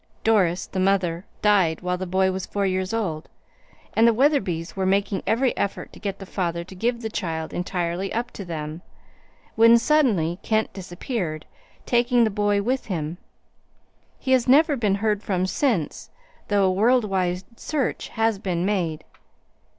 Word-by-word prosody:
Doris, 190 -6 +2
the 190 - -5
mother, 185 -2 +1 0.2
died 190 -6 +3
when 180 0 -2
the 185 - -4
boy 190 +1 +2
was 190 0 -4
four 200 -1 -1
years 185 0 -1
old, 185 -9 -3 0.6
and 225 +1 +5
the 230 - +5
Wetherbys 195 - +1
were 190 -1 0
making 195 0 +1
every 245 +3 +2
effort 200 - -3
to - - -12
get 200 -2 -4
the 195 - -9
father 170 -3 -2
to 185 - -12
give 235 +6 -1
the 220 - -2
child 160 -6 -3
entirely 180 +1 -2
up 235 +2 -2
to 200 - -7
them, 160 -2 -5 0.7
when 230 +1 +7
suddenly 230 - +2
Kent 220 0 0
disappeared, 180 - -4 0.4
taking 240 0 +3
the 220 - +2
boy 205 0 +1
with 255 +4 -1
him. 165 -3 -3 1.0
He 260 - -3
has 255 -2 +3
never 295 +4 +5
been 210 -6 +1
heard 210 0 0
from 185 -4 -1
since, 195 - -1 0.4
though 205 -1 +2
a 190 - +3
world 230 +5 +3
wide 185 -2 -1 0.2
search 290 -5 -2
has 225 -2 0
been 180 -3 -1
made. 175 -6 -1
195 Hz, 165 wpm, -24 LUFS, 180-225 Hz, 1.0 s, when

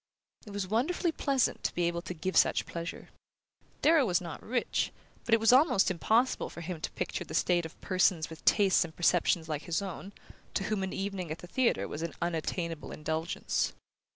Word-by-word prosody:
It - - -7
was 200 -2 -3
wonderfully 285 - +1
pleasant 275 -5 0
to - - -1
be 175 - 0
able 170 0 0
to 180 - -6
give 185 +3 -3
such - - +4
pleasure. 170 0 -6 0.7
Darrow 315 -1 +6
was 180 -1 +2
not 170 -2 -7
rich, 245 +1 -1 0.3
but 225 - +5
it - - 0
was 225 +3 +5
almost 255 - +5
impossible 225 +8 +1
for 170 - -9
him 170 -1 -5
to - - -2
picture - - -3
the - - -7
state 175 -2 +2
of 160 - -20
persons 185 -3 +2
with 160 -1 -11
tastes 195 -3 +4
and 160 -2 -9
perceptions 175 -1 +2
like 150 -1 -3
his 170 -2 0
own, 195 0 -6 0.4
to 195 - +1
whom 210 0 -1
an 190 -1 -2
evening 195 -3 -3
at 155 - -4
the - - -10
theatre 255 +6 +1
was 150 - -6
an 165 -1 -4
unattainable 170 -1 -3
indulgence. 160 +2 -2
180 Hz, 195 wpm, -30 LUFS, 170-215 Hz, 0.7 s, Darrow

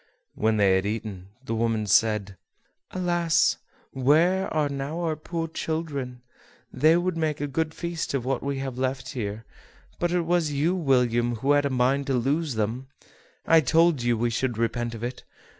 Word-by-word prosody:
When 110 0 +1
they 95 -2 +4
had 95 - -2
eaten, 105 -4 -5 0.2
the 115 - -3
woman 115 -1 0
said: 105 -1 +2 0.5
"Alas! 175 -3 +1 0.3
where 160 +8 +2
are 155 -2 +1
now 140 +3 -4
our 160 -2 -1
poor 165 +2 -4
children? 145 -7 -4 0.5
they 160 +3 +4
would 180 0 -1
make 155 -2 -1
a 145 - -1
good 155 +3 -1
feast 170 -4 -3
of 125 -3 -2
what 135 -1 -1
we 140 0 -2
have 135 -2 -5
left 130 0 -2
here; 110 -3 -5 0.5
but 175 0 0
it 175 0 +2
was 170 -2 +1
you, 150 +5 +1
William, 125 -7 +2
who 135 +6 0
had 145 0 +3
a - - -3
mind 135 +2 +1
to 135 - +1
lose 140 +3 0
them: 110 +5 -2 0.6
I 165 -1 +6
told 160 0 +3
you 120 -1 +1
we 120 +1 0
should 120 0 -1
repent 115 0 -1
of 115 - -8
it. 125 +1 -5
135 Hz, 175 wpm, -25 LUFS, 120-160 Hz, 0.6 s, I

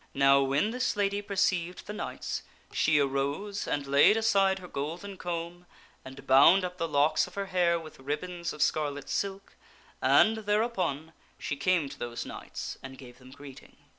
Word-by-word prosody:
Now, 135 0 +5
when 140 +10 +1
this 250 -1 -1
lady 200 0 0
perceived 190 -3 -1
the 210 - -6
knights - - -5 0.3
she 155 -1 +3
arose 140 +9 -1
and 145 -1 -1
laid 145 +10 +5
aside 195 -4 +3
her 185 -1 -10
golden 170 +7 -5
comb 175 0 -5 0.4
and 130 +1 -11
bound 160 +8 +6
up 180 0 -7
the 165 - 0
locks 150 +2 +2
of 180 - -15
her 200 0 -2
hair 175 -3 +1
with 155 -3 -12
ribbons 170 +6 -4
of 150 - 0
scarlet 145 -2 -1
silk, 195 +6 -3 0.5
and 220 0 +5
thereupon, 200 - -1 0.2
she 145 - -4
came 165 +1 +1
to 140 0 -11
those 120 0 -5
knights - - -7
and 130 0 -10
gave 125 -1 -13
them 130 0 -15
greeting. 135 0 -13
170 Hz, 165 wpm, -29 LUFS, 140-195 Hz, 0.5 s, bound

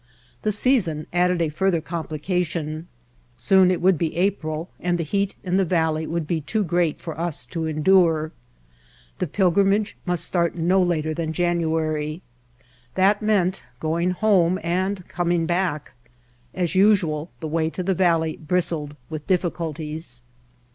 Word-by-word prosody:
The 215 - +1
season 200 - +2
added 180 -1 +2
a 160 - 0
further 180 +3 +1
complication. 160 0 -3 0.5
Soon 190 - +4
it 185 - 0
would 185 -4 +4
be 165 -2 -1
April 170 -3 -1
and 175 0 0
the 170 - -1
heat 200 +5 -1
in 185 -1 0
the 195 - +3
valley 160 -3 0
would 165 -1 -2
be 160 +1 -1
too 210 +9 -1
great 175 -3 0
for 160 -2 -7
us 170 -7 -2
to 165 +4 -4
endure. 160 0 +3 0.9
The 180 - -1
pilgrimage 195 +4 +2
must 175 -1 +1
start 170 -2 0
no 180 +3 +3
later 160 -3 0
than 160 0 -3
January. 160 -2 -1 0.7
That 195 +2 +3
meant 195 -5 +1 0.2
going 165 +4 0
home 185 -2 +3
and 185 +2 -1
coming 175 -1 0
back. 175 -3 -1 0.6
As 180 -1 -1
usual 185 -6 +3
the 160 - -4
way 160 +1 0
to 185 - -4
the 190 +2 +1
valley 165 -3 +1
bristled 155 -3 -1 0.2
with 155 -1 -6
difficulties. 160 -7 -3
170 Hz, 145 wpm, -23 LUFS, 160-185 Hz, 0.9 s, Soon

